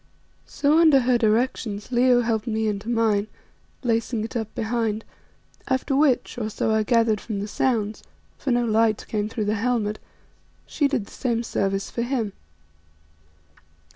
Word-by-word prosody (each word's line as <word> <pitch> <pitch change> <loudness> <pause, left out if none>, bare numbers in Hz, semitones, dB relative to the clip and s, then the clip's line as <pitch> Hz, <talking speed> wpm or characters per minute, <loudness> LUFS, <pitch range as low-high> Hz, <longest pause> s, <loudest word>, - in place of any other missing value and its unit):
So 300 +3 +2
under 310 -5 +6
her 245 -1 +2
directions 220 -1 0
Leo 245 0 +4
helped 225 -1 -1
me 220 -1 0
into 210 +1 -3
mine, 220 -3 +2 0.6
lacing 230 -1 0
it 225 - -7
up 225 -2 -3
behind, 225 -1 -1 0.6
after 265 +1 0
which, 275 -4 +2
or 215 -2 -2
so 220 +1 -1
I 220 - +3
gathered 225 -2 +2
from 215 -4 -4
the 205 - -3
sounds 215 -2 -1 0.3
for 275 - -5
no 240 -1 +2
light 220 -1 +2
came 210 -1 -2
through 220 -2 -3
the 210 - +1
helmet 220 -1 -1 0.7
she 290 - +1
did 270 -7 -1
the - - -17
same 235 -3 -1
service 195 -3 -2
for 235 - -3
him. 235 -5 -1
230 Hz, 155 wpm, -24 LUFS, 215-245 Hz, 0.7 s, under